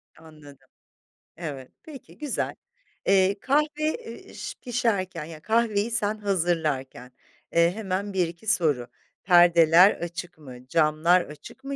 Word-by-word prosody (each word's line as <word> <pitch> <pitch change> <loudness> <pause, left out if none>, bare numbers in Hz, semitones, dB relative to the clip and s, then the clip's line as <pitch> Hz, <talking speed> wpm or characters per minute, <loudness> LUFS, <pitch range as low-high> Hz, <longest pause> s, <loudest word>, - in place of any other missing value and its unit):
Anladım. 150 -3 -16 0.7
Evet. 140 -6 -7
Peki, 295 -4 -13
güzel. 295 -4 -3 0.5
Eee, 195 +1 +3
kahve, 290 +6 +2 0.2
eee, 455 +10 -5
ş - - -6
pişerken 225 - -1
yani, 160 -1 -11
kahveyi 225 0 0
sen 215 -1 0
hazırlarken, 160 - -2 0.4
eee, 170 +1 +4
hemen 200 -1 -3
1-2 175 +2 -2
soru: 150 - +1 0.4
Perdeler 175 0 +6
açık 175 0 -7
mı, 130 -4 -13
camlar 160 +4 +3
açık 150 - -12
mı, 275 +1 -5
175 Hz, 115 wpm, -25 LUFS, 155-215 Hz, 0.7 s, Perdeler